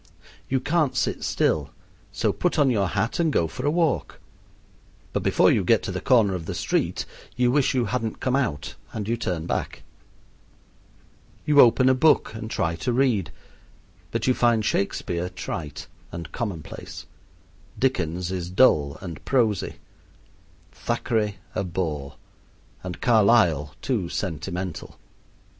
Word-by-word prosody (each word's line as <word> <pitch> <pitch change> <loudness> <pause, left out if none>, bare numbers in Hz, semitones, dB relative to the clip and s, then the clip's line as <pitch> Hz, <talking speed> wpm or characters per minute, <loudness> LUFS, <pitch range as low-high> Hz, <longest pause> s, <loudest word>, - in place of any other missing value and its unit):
You 130 - +2
can't 155 0 +1
sit - - -1
still - - +1 0.4
so - - 0
put 180 -2 0
on 140 -3 +4
your 100 -5 +1
hat 115 - -1
and 165 -2 +2
go 85 - +2
for 80 - -4
a - - +5
walk; 160 -2 0 0.9
but - - 0
before - - +4
you - - +2
get - - +3
to - - -3
the - - -4
corner 115 -7 +4
of 85 -3 -5
the - - -3
street - - -1 0.3
you 125 0 +2
wish 135 -1 +2
you 125 -2 +2
hadn't 110 +1 -2
come 130 0 0
out 105 - -1 0.2
and 105 -2 -4
you 115 - +1
turn 90 -8 -3
back. - - -3 1.6
You 150 -1 +4
open 125 +2 +5
a 130 - +6
book 140 -2 +3
and 110 0 -6
try 85 -6 -1
to 125 - -1
read, 115 -9 +1 0.8
but 115 -1 -2
you 130 - +4
find 120 -3 +2
Shakespeare 90 -3 -1
trite 85 -5 -6 0.3
and 85 -1 -7
commonplace, 100 - -6 0.7
Dickens 90 -8 0
is 90 -2 -3
dull 75 - +3
and 85 -5 -8
prosy, 115 -8 +1 1.0
Thackeray 105 -3 -1 0.2
a 105 - -1
bore, 80 -6 -3 0.7
and 90 -1 -6
Carlyle 100 - +3
too 110 -10 -1
sentimental. 90 0 -4
105 Hz, 145 wpm, -24 LUFS, 85-125 Hz, 1.6 s, a